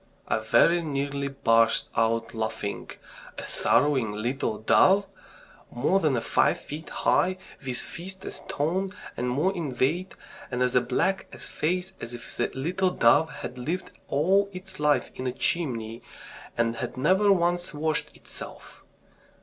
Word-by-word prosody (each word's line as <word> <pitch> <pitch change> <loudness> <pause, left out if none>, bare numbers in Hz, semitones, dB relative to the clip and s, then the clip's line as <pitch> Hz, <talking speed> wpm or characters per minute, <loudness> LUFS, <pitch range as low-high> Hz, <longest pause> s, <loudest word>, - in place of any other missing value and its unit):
I - - +1
very 120 +10 +4
nearly 140 -2 -2
burst 115 -4 +3
out 115 0 +1
laughing. 110 -2 -3 0.5
"A - - -5
sorrowing 130 -8 +2
little 115 +1 -1
dove!" 190 - +5 0.6
more 150 +11 +2
than 150 -9 +2
five - - +2
feet 155 +2 -8
high, 185 +1 +2 0.3
with 130 -2 -3
fists 190 +2 -8
a - - -4
stone 185 +7 -2 0.2
and 125 +1 -1
more 155 +10 +1
in 145 -8 -4
weight, 170 +10 0 0.3
and 125 -1 0
as 125 0 0
black 165 +11 0
a - - -10
face 180 +4 -2
as 120 +1 -6
if 120 -1 -10
the 120 - +1
little 180 +7 +1
dove 145 +1 +4
had 125 - -7
lived 165 +9 -3 0.2
all 190 +8 +3
its 185 0 -8
life 150 -1 +2
in 130 - -4
a - - 0
chimney, 120 -6 -1 0.6
and 115 0 +1
had - - -4
never 190 +9 +4
once 175 -1 +1
washed 155 0 -1
itself! - - -11
145 Hz, 145 wpm, -27 LUFS, 120-180 Hz, 0.6 s, dove